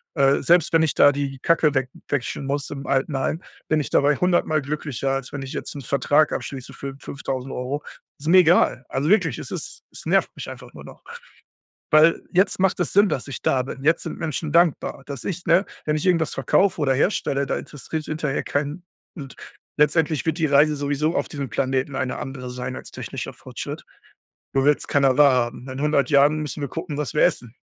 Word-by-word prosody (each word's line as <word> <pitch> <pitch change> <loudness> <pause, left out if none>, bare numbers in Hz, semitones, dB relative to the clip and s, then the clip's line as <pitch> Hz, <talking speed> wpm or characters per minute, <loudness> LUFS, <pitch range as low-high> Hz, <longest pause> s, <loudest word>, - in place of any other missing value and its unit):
Äh, 140 -2 +3
selbst, 170 +2 +3
wenn 160 -1 +5
ich 155 - +1
da 145 - +7
die 135 -1 -3
Kacke 155 0 +2
we 130 -1 +1 0.2
wechseln 140 0 -2
muss 140 +1 -2
im 140 -1 -6
Altenheim, 135 +3 0 0.3
bin 155 - +3
ich 150 - -3
dabei 145 +1 +3
hundertmal 175 -4 +2
glücklicher, 140 -2 -3
als 135 -1 -3
wenn 140 - -4
ich 135 - -7
jetzt - - -5
'n 140 - -6
Vertrag 145 +3 +2
abschließe 130 -3 -6
für 135 -1 -7
5.000€. 135 +1 -4 0.4
Ist 150 - -7
mir 185 +3 +7
egal. 170 -6 +4
Also 140 +3 -1
wirklich, 175 - +3
es - - -8
ist - - -6
es - - -11
nervt - - +2
mich - - -7
einfach - - -11
nur - - -11
noch. - - -13 0.9
Weil 155 +2 +5
jetzt 190 +1 +2
macht 190 +1 +2
es - - -1
Sinn, 200 0 +5
dass 135 -3 -3
ich 135 - -6
da 130 -1 +1
bin. 135 +1 -8
Jetzt 160 +3 +2
sind - - -6
Menschen 155 -1 -3
dankbar, 170 -5 +2
dass 140 -4 -7
ich 180 -1 -4
ne? 170 +4 +4 0.2
Wenn 150 0 +1
ich 155 - -2
irgendetwas 170 -4 +2
verkaufe 185 +8 +2
oder 135 -2 +2
herstelle, 140 -2 0
da - - -1
interessiert 155 +2 -6
hinterher 150 -2 -2
keinen, 145 +5 -3 0.3
und 140 -5 -9 0.4
letztendlich 150 0 +2
wird 160 +1 0
die 160 - +2
Reise 145 +2 +4
sowieso 145 +3 -1
auf - - 0
diesem 140 -5 -5
Planeten 130 +2 -1
eine 130 - -2
andere 130 -2 -6
sein 125 +1 -5
als - - -9
technischer - - -6
Fortschritt. - - -7 0.7
Nur 135 0 +2
will's 150 0 +2
keiner 135 -2 +3
wahrhaben. 130 -3 +3
In 130 - -6
100 145 -3 +2
Jahren 145 +1 +4
müssen 150 0 -5
wir 140 - -2
gucken, 165 -3 -5
was 150 -3 -3
wir 150 - +1
essen. 125 -9 0
145 Hz, 200 wpm, -23 LUFS, 135-160 Hz, 0.9 s, da